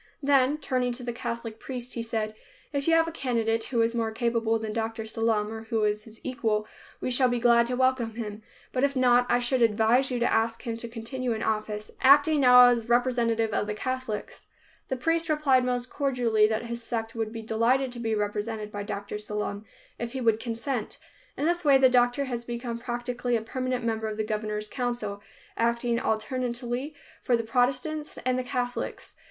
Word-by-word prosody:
Then, 275 Hz, 0 st, +4 dB
turning 255 Hz, -4 st, -1 dB
to 250 Hz, +1 st, -6 dB
the 240 Hz, -1 st, -3 dB
Catholic 230 Hz, -1 st, -5 dB
priest, 250 Hz, -1 st, -5 dB
he 235 Hz, -, -3 dB
said, 220 Hz, -2 st, -2 dB, 0.4 s
"If 280 Hz, +1 st, -1 dB
you 330 Hz, -, +5 dB
have 330 Hz, 0 st, +4 dB
a -, -, -3 dB
candidate 230 Hz, -6 st, 0 dB
who 235 Hz, -3 st, +1 dB
is 230 Hz, +1 st, 0 dB
more 230 Hz, -1 st, 0 dB
capable 230 Hz, -1 st, +1 dB
than 220 Hz, -1 st, -4 dB
Dr. 225 Hz, 0 st, -2 dB
Sallum 220 Hz, -1 st, 0 dB
or 225 Hz, 0 st, -6 dB
who 225 Hz, -1 st, 0 dB
is 210 Hz, 0 st, 0 dB
his 220 Hz, -1 st, -13 dB
equal, 220 Hz, -5 st, -1 dB, 0.3 s
we 255 Hz, -, -2 dB
shall 250 Hz, 0 st, +4 dB
be 245 Hz, 0 st, 0 dB
glad 235 Hz, 0 st, +5 dB
to 250 Hz, -, -1 dB
welcome 255 Hz, -3 st, +1 dB
him, 215 Hz, -2 st, -5 dB, 0.3 s
but 255 Hz, -, -1 dB
if 280 Hz, 0 st, +2 dB
not, 245 Hz, -1 st, +4 dB
I 240 Hz, -, +4 dB
should 245 Hz, +1 st, +1 dB
advise 230 Hz, +4 st, +3 dB
you 250 Hz, -, -1 dB
to 240 Hz, -, +1 dB
ask 225 Hz, +1 st, 0 dB
him 230 Hz, -2 st, -3 dB
to 235 Hz, -, -6 dB
continue 235 Hz, +2 st, -3 dB
in 220 Hz, -, -4 dB
office, 215 Hz, -1 st, -2 dB
acting 290 Hz, +3 st, +6 dB
now 250 Hz, -2 st, +8 dB
as 235 Hz, -1 st, 0 dB
representative 235 Hz, -3 st, +2 dB
of 210 Hz, -, 0 dB
the 210 Hz, -, -2 dB
Catholics." 255 Hz, -2 st, -4 dB, 0.4 s
The 260 Hz, -, -2 dB
priest 330 Hz, +5 st, 0 dB
replied 285 Hz, -4 st, +3 dB
most 250 Hz, 0 st, -2 dB
cordially 245 Hz, -6 st, +2 dB
that 220 Hz, +2 st, -2 dB
his 235 Hz, 0 st, -5 dB
sect 225 Hz, -1 st, -3 dB
would 225 Hz, -1 st, -3 dB
be 225 Hz, -1 st, -6 dB
delighted 235 Hz, +4 st, +1 dB
to 240 Hz, -, -8 dB
be 225 Hz, -2 st, -1 dB
represented 210 Hz, +1 st, -3 dB
by 205 Hz, -, -4 dB
Dr. 205 Hz, 0 st, -5 dB
Sallum, 210 Hz, 0 st, -4 dB, 0.3 s
if 235 Hz, 0 st, -4 dB
he 265 Hz, -, -3 dB
would 225 Hz, -2 st, +3 dB
consent. 230 Hz, 0 st, -3 dB, 0.4 s
In 290 Hz, -, -1 dB
this 345 Hz, +1 st, +1 dB
way 280 Hz, -3 st, +6 dB
the 265 Hz, -1 st, +6 dB
doctor 245 Hz, +2 st, +3 dB
has 240 Hz, -3 st, -4 dB
become 235 Hz, 0 st, -4 dB
practically 240 Hz, 0 st, -2 dB
a 225 Hz, -, 0 dB
permanent 255 Hz, +1 st, -3 dB
member 220 Hz, -1 st, -1 dB
of 215 Hz, -1 st, -4 dB
the 215 Hz, -, 0 dB
governor's 215 Hz, 0 st, -3 dB
council, 240 Hz, -4 st, -3 dB, 0.4 s
acting 235 Hz, 0 st, +1 dB
alternately 245 Hz, +5 st, -2 dB, 0.3 s
for 245 Hz, -3 st, +2 dB
the 230 Hz, -, -2 dB
Protestants 265 Hz, +6 st, 0 dB
and 255 Hz, 0 st, +1 dB
the -, -, -2 dB
Catholics. 250 Hz, -1 st, -4 dB
235 Hz, 200 wpm, -27 LUFS, 225-255 Hz, 0.4 s, now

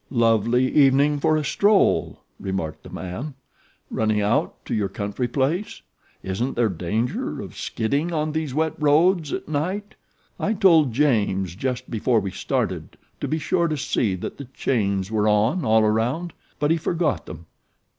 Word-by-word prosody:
"Lovely 115 Hz, +1 st, +3 dB
evening 145 Hz, +1 st, +4 dB
for 155 Hz, +1 st, +2 dB
a 155 Hz, -, -1 dB
stroll," 200 Hz, +8 st, +2 dB, 0.2 s
remarked 95 Hz, -5 st, -4 dB
the -, -, -12 dB
man. 115 Hz, +11 st, -6 dB, 0.6 s
"Running 110 Hz, -1 st, +1 dB
out 105 Hz, +2 st, 0 dB
to -, -, -4 dB
your 105 Hz, -3 st, 0 dB
country 105 Hz, +3 st, -3 dB
place? 145 Hz, -, -1 dB, 0.4 s
Isn't 95 Hz, +8 st, -2 dB
there 120 Hz, -2 st, +2 dB
danger 105 Hz, +7 st, -2 dB
of -, -, -8 dB
skidding 140 Hz, +9 st, -1 dB
on 155 Hz, -1 st, -1 dB
these 155 Hz, -2 st, -2 dB
wet 160 Hz, +3 st, 0 dB
roads 155 Hz, +2 st, +3 dB
at -, -, -4 dB
night? 185 Hz, +8 st, -2 dB, 0.5 s
I 220 Hz, -, 0 dB
told 165 Hz, -, +5 dB
James, 105 Hz, -, +1 dB
just 125 Hz, +4 st, -3 dB
before 115 Hz, +1 st, +2 dB
we 100 Hz, -2 st, -4 dB
started, -, -, -3 dB, 0.2 s
to -, -, -3 dB
be 155 Hz, -, 0 dB
sure 170 Hz, +3 st, +1 dB
to 155 Hz, -2 st, -2 dB
see 110 Hz, -7 st, 0 dB
that 90 Hz, -, -6 dB
the 140 Hz, -, -6 dB
chains 100 Hz, -6 st, -1 dB
were 110 Hz, -1 st, +1 dB
on 110 Hz, -, +2 dB
all 110 Hz, -2 st, +4 dB
around; 120 Hz, +11 st, 0 dB, 0.2 s
but 145 Hz, +1 st, +1 dB
he 165 Hz, -, +3 dB
forgot 165 Hz, -2 st, -1 dB
them. 80 Hz, +1 st, -9 dB
130 Hz, 160 wpm, -23 LUFS, 105-155 Hz, 0.6 s, told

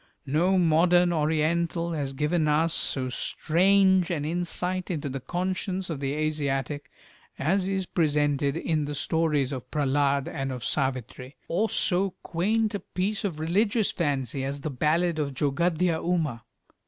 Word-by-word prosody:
No 170 Hz, +7 st, +2 dB
modern 175 Hz, +1 st, +4 dB
Oriental 165 Hz, +2 st, 0 dB
has 145 Hz, -4 st, -3 dB
given 155 Hz, +3 st, 0 dB
us 155 Hz, +2 st, +2 dB
so 130 Hz, -2 st, -1 dB
strange 190 Hz, +6 st, +3 dB
an 155 Hz, -5 st, -2 dB
insight 180 Hz, +2 st, -2 dB
into 150 Hz, -5 st, -3 dB
the 135 Hz, +1 st, -4 dB
conscience 185 Hz, +3 st, -3 dB
of 150 Hz, -, -4 dB
the 140 Hz, 0 st, -2 dB
Asiatic 145 Hz, -2 st, -2 dB, 0.5 s
as 185 Hz, +6 st, +1 dB
is 195 Hz, -1 st, -1 dB
presented 145 Hz, -4 st, +1 dB
in 155 Hz, -3 st, 0 dB
the 145 Hz, 0 st, -4 dB
stories 150 Hz, -3 st, 0 dB
of 130 Hz, -3 st, -6 dB
"Prehlad" 140 Hz, -1 st, +1 dB
and 135 Hz, -3 st, -3 dB
of 125 Hz, -2 st, -5 dB
"Savitri," 130 Hz, -1 st, -2 dB
or 210 Hz, +6 st, 0 dB
so 190 Hz, +1 st, +2 dB
quaint 215 Hz, +6 st, 0 dB
a 205 Hz, -, -2 dB
piece 195 Hz, +5 st, -3 dB
of 175 Hz, -7 st, -3 dB
religious 205 Hz, +7 st, +1 dB
fancy 135 Hz, -5 st, -1 dB
as 140 Hz, +1 st, -4 dB
the 155 Hz, -, -3 dB
ballad 155 Hz, +5 st, +1 dB
of 140 Hz, -3 st, -2 dB
"Jogadhya 160 Hz, +4 st, +1 dB
Uma." 155 Hz, -9 st, -1 dB
160 Hz, 145 wpm, -26 LUFS, 140-180 Hz, 0.5 s, modern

